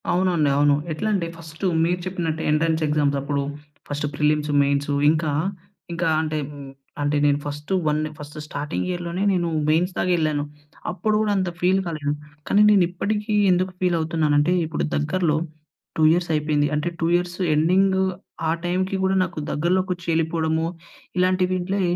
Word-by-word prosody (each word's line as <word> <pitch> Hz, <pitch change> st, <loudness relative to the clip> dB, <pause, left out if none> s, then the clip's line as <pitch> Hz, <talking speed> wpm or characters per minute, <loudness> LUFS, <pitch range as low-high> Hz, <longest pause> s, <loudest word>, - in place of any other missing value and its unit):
అవునండి. 175 Hz, -4 st, +2 dB
అవును. 145 Hz, 0 st, +4 dB, 0.2 s
ఎట్లా 155 Hz, +8 st, -2 dB
అంటే 180 Hz, -4 st, 0 dB
ఫస్ట్, 160 Hz, +1 st, -11 dB, 0.2 s
మీరు 180 Hz, +1 st, 0 dB
చెప్పినట్టు 170 Hz, -4 st, -2 dB
ఎంట్రన్స్ 160 Hz, +1 st, +1 dB
ఎగ్జామ్స్ 145 Hz, -1 st, +1 dB
అప్పుడు 140 Hz, +1 st, -1 dB, 0.5 s
ఫస్ట్ 145 Hz, +1 st, -2 dB
ప్రిలిమ్స్, 150 Hz, +1 st, +1 dB
మెయిన్స్. 140 Hz, +1 st, 0 dB, 0.2 s
ఇంకా, 155 Hz, -1 st, 0 dB, 0.6 s
ఇంకా 170 Hz, 0 st, 0 dB
అంటే 155 Hz, -1 st, -2 dB, 0.6 s
అంటే 145 Hz, +1 st, +1 dB
నేను 145 Hz, -1 st, +3 dB
ఫస్ట్ 150 Hz, +3 st, -6 dB, 0.2 s
వన్ 150 Hz, 0 st, +2 dB, 0.2 s
ఫస్ట్ 150 Hz, +1 st, -10 dB
స్టార్టింగ్ 150 Hz, +1 st, -3 dB
ఇయర్‌లోనే 175 Hz, 0 st, -3 dB
నేను 175 Hz, -2 st, 0 dB, 0.2 s
మెయిన్స్ 175 Hz, +4 st, +2 dB
దాక -, -, 0 dB
ఎళ్ళాను. 155 Hz, -3 st, 0 dB, 0.5 s
అప్పుడు 195 Hz, +4 st, -1 dB
కూడా 215 Hz, -1 st, +1 dB
అంత 185 Hz, -2 st, 0 dB
ఫీల్ 185 Hz, +2 st, +3 dB
కాలేదు. 155 Hz, -4 st, -2 dB, 0.4 s
కానీ, 205 Hz, -, +4 dB
నేను 200 Hz, -3 st, +5 dB
ఇప్పటికీ 210 Hz, +4 st, -2 dB, 0.2 s
ఎందుకు 185 Hz, +1 st, +1 dB
ఫీల్ 180 Hz, -2 st, +2 dB
అవుతున్నానంటే, 155 Hz, 0 st, +2 dB
ఇప్పుడు 155 Hz, -1 st, -2 dB
దగ్గరలో 155 Hz, +1 st, +1 dB, 0.6 s
2 160 Hz, -, +2 dB
ఇయర్స్ 175 Hz, +1 st, +1 dB
అయిపోయింది. 150 Hz, -1 st, +1 dB
అంటే 150 Hz, +3 st, -1 dB
2 165 Hz, -, +2 dB
ఇయర్స్ 175 Hz, 0 st, -1 dB, 0.2 s
ఎండింగ్ 190 Hz, +5 st, +3 dB, 0.5 s
ఆ -, -, +3 dB
టైమ్‌కి 185 Hz, +2 st, 0 dB
కూడా 190 Hz, 0 st, +2 dB
నాకు 175 Hz, -3 st, -5 dB
దగ్గరలోకొచ్చి 180 Hz, +2 st, 0 dB
ఎళ్ళిపోవడము 160 Hz, 0 st, 0 dB, 0.5 s
ఇలాంటి 185 Hz, 0 st, +3 dB
వింట్లే 185 Hz, +2 st, -1 dB
165 Hz, 150 wpm, -23 LUFS, 150-180 Hz, 0.6 s, నేను